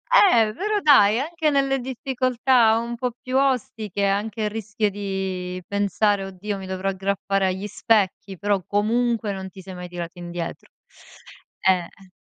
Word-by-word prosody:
eh, 230 - +6
però 420 - -1
dai, 230 - +6
anche 320 +2 0
nelle 275 -1 +2
difficoltà 255 -2 +2
un 235 +1 -3
po' 245 0 -3
più 255 +1 -5
ostiche, 250 -7 0
anche 210 +2 -1
il 210 - 0
rischio 215 0 -1
di 190 -2 -4
pensare: 200 0 +1
"Oddio 195 +2 -5
mi 190 - -8
dovrò 190 +1 -2
aggrappare 195 0 0
agli 190 +2 -2
specchi." 205 -2 0
Però 200 0 0
comunque 225 +1 0
non 190 -1 -6
ti 190 0 -12
sei 190 0 -9
mai 180 0 -7
tirato 175 0 -7
indietro. 175 -1 -6 1.0
Eh, 185 -2 +4
eh. 190 +2 -18
205 Hz, 150 wpm, -23 LUFS, 190-240 Hz, 1.0 s, eh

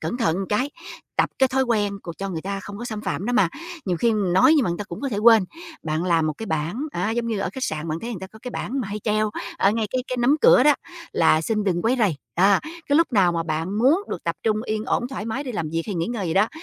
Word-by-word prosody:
cẩn 240 - -3
thận 195 -9 +1
cái, 255 +7 0 0.5
tập - - +2
cái 265 -1 +4
thói 265 +1 +1
quen 205 -5 0
c 170 -3 -9
cho 195 0 -3
người 165 -4 -4
ta 195 +1 -3
không 200 +2 -9
có 240 - -5
xâm 215 -3 -4
phạm 175 0 -3
đó 245 - 0
mà, 200 -9 +4 0.4
nhiều 180 -3 0
khi 230 +5 +2
nói 190 - +4
nhưng 275 - +3
mà 175 - 0
người 170 - -3
ta 205 - -4
cũng 170 - -8
có 275 - -2
thể 210 - -3
quên. 225 -2 +6 0.4
Bạn 155 +2 -1
làm 165 -3 +2
một 155 - 0
cái 225 - -5
bảng 160 - -2
á 180 +5 -1
giống 235 +1 -1
như 225 -3 -1
ở 195 - -1
khách 265 -1 -3
sạn 155 +1 -3
bạn 160 +1 -2
thấy 235 - -5
người 195 -6 -5
ta 190 - -6
có 220 +3 -16
cái 250 - -5
bảng 265 +2 -3
mà 215 - -4
hay 210 +1 -4
treo 215 0 0 0.3
ở 195 - +4
ngay 220 0 0
cái 255 0 -1
cái 255 - -2
nắm 275 +5 +4
cửa - - +7
đó 295 0 +6 0.4
là 160 -1 +4
"Xin 215 +3 -1
đừng 175 -3 0
quấy 245 +3 +2
rầy," 195 -10 +2 0.2
đó, 195 +2 +5
cái 315 -2 -2
lúc 330 -5 +3
nào 185 -5 +4
mà 165 -1 -1
bạn 165 +6 -2
muốn 285 - +4
được - - -5
tập - - -1
trung 215 -1 +2
yên 215 -1 -2
ổn 245 -1 0
thoải 265 -6 -5
mái 260 +6 -3
đi 250 - -4
làm 165 -7 -2
việc 165 0 -1
hay 205 - -3
nghỉ 165 +1 -1
ngơi 225 -6 -3
gì 165 - -1
đó, 205 +3 +4
210 Hz, 300 wpm, -23 LUFS, 175-240 Hz, 0.5 s, cửa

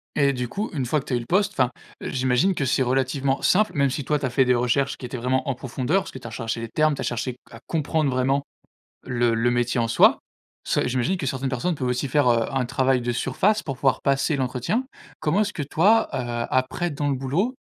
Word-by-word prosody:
Et 140 -2 +3
du 125 -1 -3
coup, 205 - -3
une 135 -5 -1
fois 150 +5 +1
que 135 - -10
tu - - -4
as - - +3
eu - - -1
le 120 - -7
poste, 200 +5 +2
enfin, 130 -7 +2 0.3
j'imagine 130 +8 +1
que 140 - -1
c'est 130 - +1
relativement 135 +2 0
simple. 210 +3 +3
Même 140 -1 +3
si 140 +2 -3
toi, 150 +3 +1
tu 140 - -2
as - - 0
fait 130 +2 +3
des 125 0 +3
recherches 125 +3 +1
qui - - -8
étaient 125 +1 -5
vraiment 130 +2 -1
en 135 - +1
profondeur, 130 +8 -1
parce - - -9
que - - -9
tu 125 - -16
as - - -6
recherché 115 +1 -4
les 115 - -4
termes, 155 +3 +2
tu - - -6
as - - -2
cherché 120 +1 -2 0.2
à - - -11
comprendre 155 -1 0
vraiment 135 +2 +1 0.6
le 120 -2 +1
le 115 +2 +2
métier 120 0 +1
en 115 - 0
soi. 115 - +5 0.5
Ça - - 0
j'imagine 130 +9 0
que 175 - -4
certaines 130 +1 -2
personnes 130 +8 -1
peuvent 130 -4 -3
aussi 125 +2 -1
faire, 140 0 +3
heu, 115 -1 +2
un 130 -2 0
travail 130 0 +1
de 120 0 -1
surface, 200 - +1
pour 135 -3 -5
pouvoir 135 0 +1
passer 140 +2 +1
l'entretien. 130 - -1 0.4
Comment 155 +7 +1
est-ce 210 -1 0
que 150 - -3
toi, 205 +10 +3
heu, 120 -3 -2
après 130 +7 0
dans 145 0 -2
le 140 - +1
boulot, 155 - -1
130 Hz, 250 wpm, -24 LUFS, 125-150 Hz, 0.6 s, soi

